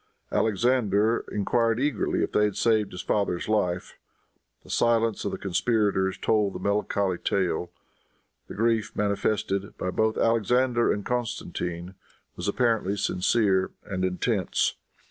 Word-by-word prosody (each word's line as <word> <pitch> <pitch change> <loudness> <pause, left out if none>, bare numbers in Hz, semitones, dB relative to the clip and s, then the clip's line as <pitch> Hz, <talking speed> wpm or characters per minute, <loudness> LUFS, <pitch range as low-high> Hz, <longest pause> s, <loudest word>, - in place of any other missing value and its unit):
Alexander 110 -1 +2
enquired 115 +3 +1
eagerly 140 -3 0
if - - -2
they 105 - +3
had 105 -2 -2
saved 110 -2 +2
his 90 - -6
father's 100 -4 -1
life. 95 -5 -1 0.6
The - - -11
silence 115 -2 +1
of - - -1
the - - -4
conspirators 100 -1 0
told 105 -3 +1
the - - -6
melancholy 100 -2 0
tale. 90 -2 -1 0.8
The - - -8
grief 115 0 +1
manifested 100 -1 -1
by 90 - -2
both 110 +2 +1
Alexander 120 +2 +2
and 100 - -3
Constantine 90 -7 -3 0.4
was - - -5
apparently 110 -3 +1
sincere 95 0 +1 0.2
and 95 -1 -3
intense. 95 +1 0
105 Hz, 125 wpm, -26 LUFS, 95-115 Hz, 0.8 s, they